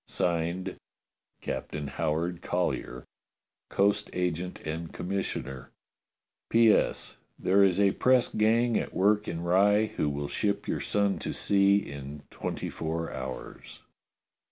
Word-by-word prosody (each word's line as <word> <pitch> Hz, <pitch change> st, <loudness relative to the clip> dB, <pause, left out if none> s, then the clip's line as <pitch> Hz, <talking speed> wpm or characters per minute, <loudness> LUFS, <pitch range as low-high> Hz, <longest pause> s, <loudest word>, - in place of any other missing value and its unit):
[Signed] 85 Hz, +2 st, -1 dB, 0.6 s
"Captain 75 Hz, -, -4 dB
Howard 80 Hz, +4 st, -2 dB
Collyer, 75 Hz, -8 st, -2 dB, 0.6 s
"Coast 100 Hz, +1 st, +2 dB
Agent 90 Hz, 0 st, -2 dB
and 80 Hz, +1 st, -5 dB
Commissioner. 85 Hz, -9 st, -4 dB, 0.8 s
"P.S. 115 Hz, -1 st, +3 dB, 0.2 s
There 100 Hz, +2 st, +4 dB
is 95 Hz, -1 st, +3 dB
a 100 Hz, -1 st, +5 dB
press 125 Hz, +2 st, +3 dB
gang 115 Hz, +2 st, +3 dB
at -, -, -5 dB
work 105 Hz, +2 st, +3 dB
in 85 Hz, -, -3 dB
Rye 105 Hz, +4 st, +3 dB
who 75 Hz, -, +1 dB
will 70 Hz, 0 st, -3 dB
ship 100 Hz, +8 st, -1 dB
your -, -, -1 dB
son 100 Hz, -1 st, +1 dB
to -, -, -4 dB
sea 100 Hz, 0 st, +3 dB
in 70 Hz, -4 st, -6 dB
twenty -, -, -4 dB
four 80 Hz, +1 st, -3 dB
hours." 65 Hz, 0 st, -7 dB
90 Hz, 120 wpm, -28 LUFS, 80-100 Hz, 0.8 s, a